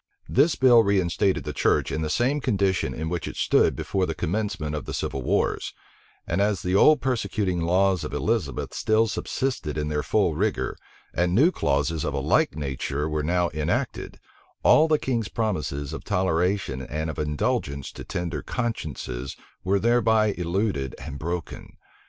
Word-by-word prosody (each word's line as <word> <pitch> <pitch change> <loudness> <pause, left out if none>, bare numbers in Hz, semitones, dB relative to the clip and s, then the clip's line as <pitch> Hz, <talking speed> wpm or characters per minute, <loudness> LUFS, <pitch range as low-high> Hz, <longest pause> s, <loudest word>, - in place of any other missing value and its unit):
This 145 +5 +3
bill 125 -3 +6
reinstated 95 -2 +1
the - - -5
church - - +1
in 80 - -2
the 80 - -2
same 130 - +1
condition 100 - +1
in 80 +4 -4
which 85 -1 -3
it - - -6
stood - - +3
before 95 -2 -1
the 80 - -3
commencement 90 -4 -2
of 75 - -5
the - - -4
civil 70 - -3
wars; - - 0 0.5
and 85 +4 0
as 100 -2 +1
the 90 - -1
old 150 +10 +6
persecuting 100 -8 -1
laws 90 +1 +2
of - - -5
Elizabeth 105 -10 -1
still 110 +1 +2
subsisted 115 - -2
in 75 0 -1
their 75 -1 0
full 85 +3 +1
rigor, 100 +6 -1 0.4
and 90 +1 +1
new 150 - +5
clauses 75 - 0
of - - -2
a - - 0
like - - +2
nature 70 0 -3
were 75 -1 -1
now 85 +2 +1
enacted, 75 0 -2 0.5
all 155 +1 +6
the 155 -1 +3
king's 120 -7 -2
promises 75 -10 -2
of - - -6
toleration 90 -6 0
and 80 +4 -3
of 75 - -8
indulgence 75 -2 -1
to - - -9
tender 85 -4 -3
consciences 70 - -4 0.3
were 100 +2 +2
thereby 110 -1 +3
eluded 85 - -1
and 70 - -7
broken. 85 +2 -5
90 Hz, 165 wpm, -25 LUFS, 75-110 Hz, 0.5 s, bill